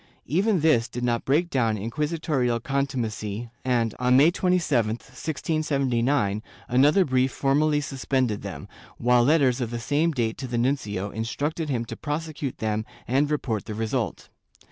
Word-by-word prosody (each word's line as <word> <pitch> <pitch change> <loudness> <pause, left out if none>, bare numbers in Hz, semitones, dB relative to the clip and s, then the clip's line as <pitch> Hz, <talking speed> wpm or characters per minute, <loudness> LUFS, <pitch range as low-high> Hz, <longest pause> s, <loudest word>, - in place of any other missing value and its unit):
Even 190 - +1
this 135 -7 +3
did 125 - -6
not 120 -1 0
break 160 +6 +2
down 115 -5 +1
inquisitorial 135 - -1
contumacy 120 -5 -3
and, 120 -4 +1
on 125 0 +4
May 150 +5 +6
27, 160 - +1
1679, 135 -6 -1 0.3
another 145 +9 +4
brief 130 -1 +2
formally 145 +2 +2
suspended 130 -5 -1
them, - - -7 0.3
while 125 0 +4
letters 135 -3 +3
of 120 - -1
the 120 - -4
same 150 +7 +1
date 115 -6 -1
to 130 - -4
the 120 -1 -2
nuncio 105 -6 -1
instructed 145 +8 -3
him 120 -4 -1
to - - -7
prosecute 150 -2 -4
them 110 0 -1 0.2
and 140 +4 +2
report 115 -9 -1
the 110 - -5
result. 110 -1 -2
130 Hz, 145 wpm, -25 LUFS, 115-150 Hz, 0.3 s, May